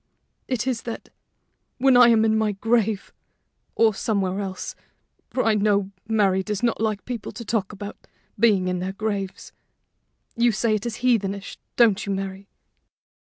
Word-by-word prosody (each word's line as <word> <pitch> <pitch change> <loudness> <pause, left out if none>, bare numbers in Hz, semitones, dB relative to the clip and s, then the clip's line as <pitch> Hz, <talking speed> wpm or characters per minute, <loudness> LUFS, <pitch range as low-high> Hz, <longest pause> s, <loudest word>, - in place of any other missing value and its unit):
It 255 -3 -1
is 255 -3 -1
that, 230 - -7 0.7
when 265 0 +4
I 245 -1 +8
am 225 -2 +5
in 220 0 +3
my 215 -1 +1
grave 220 0 0 0.6
or 225 -1 +4
somewhere 195 -2 -1
else, 190 -2 -5 0.6
for 255 - -1
I 225 - +4
know 200 -2 +1 0.2
Mary 200 -4 +2
does 210 +2 -4
not 235 -2 +1
like 215 -2 -1
people 240 -4 -5
to 235 - -8
talk 210 -3 -1
about 205 0 -9 0.3
being 200 -5 +4
in 180 0 -1
their 185 +1 -3
graves 195 -2 -4 0.8
you 235 0 +3
say 220 +1 +1
it 215 +2 -1
is 235 +1 -6
heathenish, 200 -5 0 0.2
don't 220 -5 +4
you, 200 - -3
Mary? 195 0 -4
210 Hz, 160 wpm, -24 LUFS, 195-230 Hz, 0.8 s, I